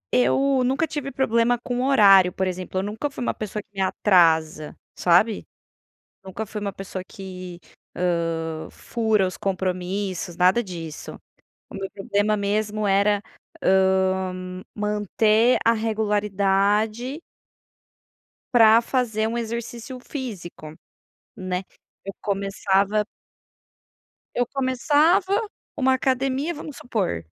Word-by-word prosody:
Eu 255 - +3
nunca 265 +6 +1
tive 290 -3 -5
problema 240 -2 +2
com 245 +1 -3
horário, 195 -8 +6
por 190 - -2
exemplo, 185 0 -4
eu 190 - 0
nunca 215 +8 -3
fui 275 - -6
uma - - 0
pessoa 210 -1 -5
que - - -48
me 195 - -3
atrasa, 165 -6 +2 0.2
sabe. 190 +5 +3 0.8
Nunca 195 +3 -6
fui 210 0 -6
uma 200 -1 -4
pessoa 195 -1 -6
que, 185 -2 -9 0.4
hã, 165 -2 -1
fura 220 -4 0
os 185 - -6
compromissos, 185 -1 -3
nada 185 +7 +4
disso. 165 -6 -8 0.5
O - - -12
meu 195 -1 -5
problema 205 +1 0
mesmo 210 +1 -1
era, 200 +1 +3 0.4
hã, 190 -1 +1
manter 210 +3 +2
a 230 - +5
regularidade 210 - 0 1.3
para 225 -1 +7
fazer 225 -4 0
um 230 - -3
exercício 235 +2 -5
físico, 190 - -7 0.6
né, 185 0 -3 0.4
eu 195 - -5
começava 200 +1 0 1.3
eu 245 - +2
começava 295 - +2 0.4
uma 265 -1 +3
academia 265 +4 0
vamos 300 -3 -9
supor, 195 - -2
205 Hz, 110 wpm, -23 LUFS, 185-235 Hz, 1.3 s, para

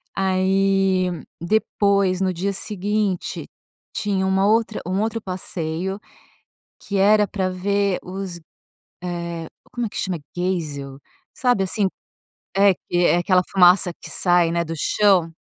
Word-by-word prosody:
Aí, 190 0 +2 0.3
depois, 200 0 +1
no 190 -1 +2
dia 190 +3 -2
seguinte, 205 -1 -2 0.4
tinha 195 -2 -1
uma 190 +1 +2
outra 220 +1 +2
um 185 +3 -1
outro 225 +1 -1
passeio 185 0 -4 0.8
que 200 - -5
era 210 +2 +5
pra 190 -2 -2
ver 200 +1 0
os 185 -1 -6 0.6
eh, 170 -2 -4 0.2
como 240 -1 -2
é - - -3
que - - -11
chama? 185 -3 -2 0.2
Geisel. 150 -7 -3 0.4
Sabe, 245 -6 +2
assim 195 +1 0 0.7
é 200 -1 +5
que 175 - -4
é - - +4
aquela 180 +1 +3
fumaça 180 -1 +5
que - - -9
sai, 175 -2 +2
né, 170 0 0
do 165 0 -5
chão. 180 0 +2
190 Hz, 130 wpm, -22 LUFS, 175-200 Hz, 0.8 s, era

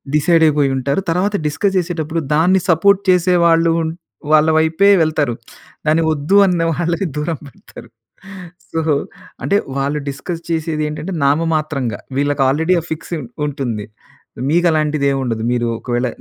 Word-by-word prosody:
Decide 165 +2 +3
అయిపోయి 145 -2 +2
ఉంటారు. 140 +7 -1
తర్వాత 185 +5 0
డిస్కస్ 190 +7 -1
చేసేటప్పుడు 165 -2 -2
దాన్ని 180 +4 +3
సపోర్ట్ 195 +4 +4
చేసే 180 0 +3
వాళ్ళు 165 0 +4
ఉన్ 160 0 -2 0.4
వాళ్ళ 155 +1 +5
వైపే 160 +5 +3
వెళ్తారు. 155 -5 0 0.5
దాన్ని 160 +2 +3
వద్దు 155 +5 0
అన్న 180 -2 +1
వాళ్ళని 170 +3 -1
దూరం 150 +1 -2
పెడతారు. 125 -3 -14 0.8
సో 165 - -1 0.6
అంటే 200 - +1 0.2
వాళ్ళు 140 +2 -1
డిస్కస్ 165 +5 -6
చేసేదేంటంటే 155 +1 -2
నామమాత్రంగా 150 -6 0 0.2
వీళ్ళకి 145 0 +1
ఆల్రెడీ 160 +6 +1
ఆ - - -15
ఫిక్స్ 160 +2 -5 0.3
ఉంటుంది. 120 -7 -4 0.6
మీకు 175 +3 +3
అలాంటిది 155 -2 0
ఏముండదు. 125 -5 -2
మీరు 120 -1 0
ఒకవేళ 120 0 -1
155 Hz, 135 wpm, -17 LUFS, 145-170 Hz, 0.8 s, వాళ్ళ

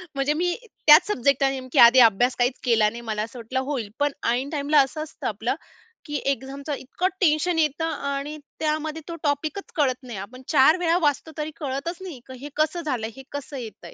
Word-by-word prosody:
म्हणजे 275 +2 +1
मी 350 +2 0 0.3
त्याच 305 +6 +9
सब्जेक्ट 275 - +2
नेमकी 260 -2 0
आधी 240 +2 +9
अभ्यास 240 +2 +5
काहीच 245 +1 +1
केला 220 -3 +4
नाही. 235 +2 -8
मला 210 0 -1
असं 230 +2 -8
वाटलं, 255 +3 -3
होईल, 235 -8 -2
पण 290 0 +2 0.2
ऐन 260 +4 -1
टाईमला 290 0 +3
असं 300 +3 -2
असतं 310 - -6
आपलं, - - -2 0.5
की 295 -1 -5
एक्झामचं 275 +2 -3
इतकं 280 +7 -2
टेन्शन 325 +1 +2
येतं 310 +1 +1 0.3
आणि 290 +2 -4 0.2
त्यामध्ये 310 0 -1
तो 335 - -4
टॉपिकच 305 +7 -2
कळत 260 -4 +1
नाही. 235 -5 -7
आपण 255 +6 -9
4 305 +4 +6
वेळा 340 0 +2
वाचतो, 290 +2 -1
तरी 305 +1 -3
कळतच 285 +4 -3
नाही, 345 -9 -7
की 260 -1 -9
हे 290 - -6
कसं 315 +3 +1
झालं? 250 -8 -2
हे 270 - -9
कसं 285 0 -6
येत 220 -5 -9
आहे? - - -10
280 Hz, 200 wpm, -24 LUFS, 255-310 Hz, 0.5 s, त्याच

